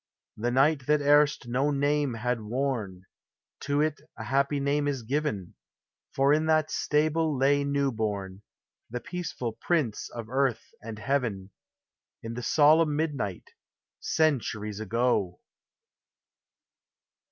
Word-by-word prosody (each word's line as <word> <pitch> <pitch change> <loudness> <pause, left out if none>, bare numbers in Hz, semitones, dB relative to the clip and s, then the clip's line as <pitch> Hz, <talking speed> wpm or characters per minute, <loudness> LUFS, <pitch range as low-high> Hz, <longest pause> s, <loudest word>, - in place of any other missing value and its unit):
The 120 +3 -1
night 135 +2 +2
that 150 0 +4
erst 145 -2 +3
no 130 +4 +1
name 145 -2 +1
had 120 +1 -2
worn, 110 -5 -3 0.6
To 145 +1 0
it 155 -1 -1 0.2
a 110 - -6
happy 140 +4 +1
name 145 +1 0
is 135 -4 -2
given; 125 - -2 0.6
For 135 +2 +4
in 155 +1 +1
that 155 -1 +2
stable 155 0 +1
lay 140 +2 +3
new 140 -1 0
born, 100 -4 -3 0.5
The 125 - -4
peaceful 175 -8 -4
Prince 150 -11 0
of 115 -2 -7
Earth 130 -2 0
and 110 0 -7
Heaven, 105 -5 -2 0.7
In 115 0 -5
the 125 - -5
solemn 155 +3 +4
midnight. 140 - -3 0.5
Centuries 110 -9 0
ago 110 -4 0
135 Hz, 120 wpm, -27 LUFS, 115-150 Hz, 0.7 s, that